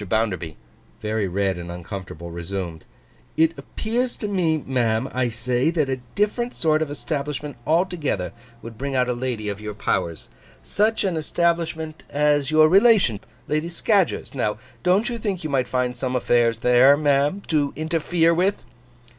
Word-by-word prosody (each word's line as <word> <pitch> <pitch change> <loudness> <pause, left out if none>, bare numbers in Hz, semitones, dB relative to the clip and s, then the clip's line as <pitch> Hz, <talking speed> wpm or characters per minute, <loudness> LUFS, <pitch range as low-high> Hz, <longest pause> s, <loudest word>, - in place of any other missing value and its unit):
Bounderby, 95 -8 -1 0.4
very 105 -1 -1
red 95 0 0
and 85 0 -6
uncomfortable, 85 -1 -7
resumed: 85 -1 -5 0.5
'It 160 0 +4
appears 240 +3 -2
to 210 - -3
me, 175 -6 +1
ma'am, 120 -2 +1
I 125 -1 +1
say, 120 +4 0
that 155 -5 0
a 130 - 0 0.2
different 235 +4 0
sort 155 -1 +2
of 155 - -1
establishment 145 +1 -4
altogether 155 - 0 0.3
would 115 -1 -9
bring 140 0 -3
out 125 -1 +2
a - - +1
lady 120 -3 -3
of 100 0 -4
your 105 -1 -6
powers. 85 -9 -2 0.3
Such 215 - +1
an 190 -4 0
establishment 160 -1 -1
as 145 -1 +2
your 155 0 +6
relation, 195 - +5 0.3
Lady 155 +3 -1
Scadgers's, 190 +2 +1
now. 105 -6 -1 0.2
Don't 190 +5 +3
you 235 -1 -3
think 200 -5 -3
you 155 - -3
might 130 -3 +1
find 125 -1 -1
some 130 -1 -2
affairs 120 -2 +2
there, 125 +3 +6
ma'am, 145 +6 +2
to 145 -3 +2
interfere 165 +1 +1
with? 185 +4 0
140 Hz, 155 wpm, -23 LUFS, 115-165 Hz, 0.5 s, your